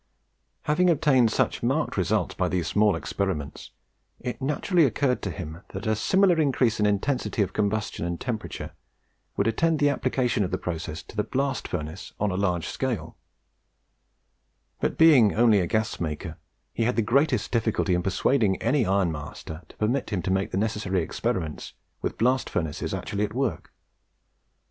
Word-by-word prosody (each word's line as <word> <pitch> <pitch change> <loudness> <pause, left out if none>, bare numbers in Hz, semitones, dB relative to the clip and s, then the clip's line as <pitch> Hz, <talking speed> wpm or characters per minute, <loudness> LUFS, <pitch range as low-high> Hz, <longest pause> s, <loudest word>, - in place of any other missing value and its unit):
Having 180 +5 +3
obtained 135 -7 +4
such - - 0
marked 135 +6 0
results 95 +1 0
by 90 -1 -1
these 90 -1 -1
small 105 +2 +3
experiments, 90 -8 -3 0.5
it 125 - -5
naturally 160 +5 +2
occurred 130 0 +1
to 95 - -3
him 80 0 -7
that 95 +1 -5
a 110 0 +2
similar 185 - +3
increase 130 -6 +2
in 105 - +3
intensity 110 +2 0
of 95 - -5
combustion 105 -3 -1
and 85 0 -3
temperature 115 -4 -4 0.7
would 100 - +2
attend 160 +9 +2
the 145 0 +3
application 130 -5 0
of 90 - -2
the - - -1
process 80 -2 -5
to - - -14
the 105 - +1
blast 135 +3 -2
furnace 80 +2 -5
on 105 -1 +1
a - - -2
large 90 -4 0
scale; - - -3 1.6
but - - -1
being 140 -10 +6
only 115 -3 +5
a 90 - 0
gas 110 +4 -1
maker, 80 0 -4 0.4
he 115 - 0
had 125 - +1
the 115 - +2
greatest 125 +1 +2
difficulty 110 -5 +1
in 90 - +2
persuading 95 +2 +1
any 120 -1 +1
ironmaster 80 -4 -2
to - - -17
permit 120 +6 0
him 95 -6 -2
to 95 - -1
make 95 +1 0
the - - -3
necessary 100 -4 0
experiment's 80 0 -3 0.3
with - - -3
blast 125 +2 +2
furnaces 80 -3 -2
actually 105 0 -2
at 105 - -3
work. 130 - -2
105 Hz, 165 wpm, -26 LUFS, 90-130 Hz, 1.6 s, being